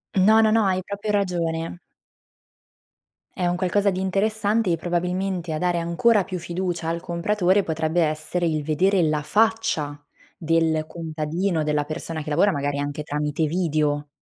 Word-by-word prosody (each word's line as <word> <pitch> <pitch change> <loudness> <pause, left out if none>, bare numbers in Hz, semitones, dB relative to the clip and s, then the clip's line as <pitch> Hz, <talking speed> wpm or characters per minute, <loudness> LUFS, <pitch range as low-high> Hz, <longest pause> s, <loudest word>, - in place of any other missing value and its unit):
No, 215 +4 +5
no, 215 -1 +4
no, 225 -1 +4
hai 185 -1 +1
proprio 200 +2 -4
ragione. 175 -4 -1 1.6
È 180 - +1
un 175 0 +1
qualcosa 195 +2 +1
di 185 - -3
interessante, 205 +1 +1
e 165 - +1
probabilmente 180 0 -2
a 155 - -2
dare 175 -1 +1
ancora 185 +5 +2
più 180 -1 -5
fiducia 175 -1 -3
al 170 0 -2
compratore, 185 +3 +1
potrebbe 160 0 0
essere 155 +3 0
il 155 -2 -1
vedere 180 +5 +2
la 155 -1 +1
faccia 205 -5 +1 0.4
del 160 -1 +1
contadino, 165 +2 -2
della 150 -1 0
persona 155 0 -5
che 150 - -6
lavora, 195 +7 +4
magari 145 -2 -2
anche 145 +1 -3
tramite 150 +1 -1
video. 150 -3 0
170 Hz, 150 wpm, -23 LUFS, 155-190 Hz, 1.6 s, No